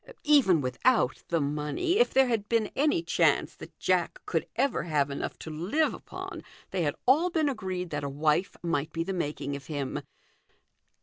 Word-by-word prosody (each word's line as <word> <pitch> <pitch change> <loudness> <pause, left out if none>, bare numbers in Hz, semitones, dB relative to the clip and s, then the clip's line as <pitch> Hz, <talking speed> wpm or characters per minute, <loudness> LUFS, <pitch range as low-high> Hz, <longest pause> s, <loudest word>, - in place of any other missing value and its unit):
Even 265 - +5
without 130 - +1
the 170 - +1
money, 150 - 0
if 485 - +4
there 265 0 +5
had 220 -4 -1
been 230 -2 +1
any 305 +5 +2
chance - - +2
that - - -12
Jack - - 0
could - - -1
ever 275 -9 +1
have 150 -4 0
enough 140 - -4
to 160 - -8
live 195 - 0
upon, - - -8 0.3
they 190 - -1
had 145 -3 0
all 305 +8 +4
been 320 -3 +1
agreed 185 -9 -3
that 145 -1 -3
a 140 - -2
wife 150 +6 0
might 165 -2 -1
be 165 +1 -2
the 195 - -3
making 145 -4 -3
of 140 - -9
him. 145 -4 -3
175 Hz, 180 wpm, -28 LUFS, -, 0.3 s, Even